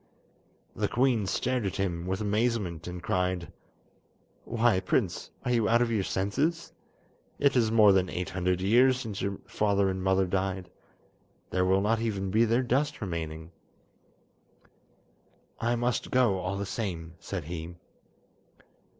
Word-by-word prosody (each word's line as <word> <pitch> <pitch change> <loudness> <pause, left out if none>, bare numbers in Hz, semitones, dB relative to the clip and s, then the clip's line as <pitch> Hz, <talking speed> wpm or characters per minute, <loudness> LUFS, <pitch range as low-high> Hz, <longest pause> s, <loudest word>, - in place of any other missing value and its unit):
The - - 0
queen 120 -4 +1
stared 125 +4 0
at 95 - -2
him 90 -3 -2
with 95 +2 -2
amazement, 105 -6 -1
and 90 0 -6
cried: 90 -2 -1 0.9
"Why, 115 -4 +2
prince, 95 -1 -1 0.2
are 125 - 0
you 115 -3 +2
out 120 +1 +4
of 120 - -2
your 110 -3 +1
senses? 120 - -1 0.6
It 140 -1 +2
is 115 -3 +3
more 110 -3 +7
than 95 -1 +2
eight 90 0 -4
hundred 90 -1 0
years 125 +6 +4
since 110 -6 -5
your 100 0 -2
father 100 -2 +1
and 95 0 -4
mother 95 0 +3
died! 95 -1 -2 0.8
There 90 0 +1
will 95 +1 +3
not 110 +2 +1
even 100 -4 -2
be 110 +3 +4
their 115 +3 +2
dust 140 +5 0
remaining." 80 -3 -5 2.1
"I 120 +1 +1
must 120 +1 -1
go 120 -7 +3
all 90 +2 -3
the 100 - -3
same," 85 -6 -4
said 95 -4 -5
he. 85 +2 -6
100 Hz, 145 wpm, -28 LUFS, 90-115 Hz, 2.1 s, more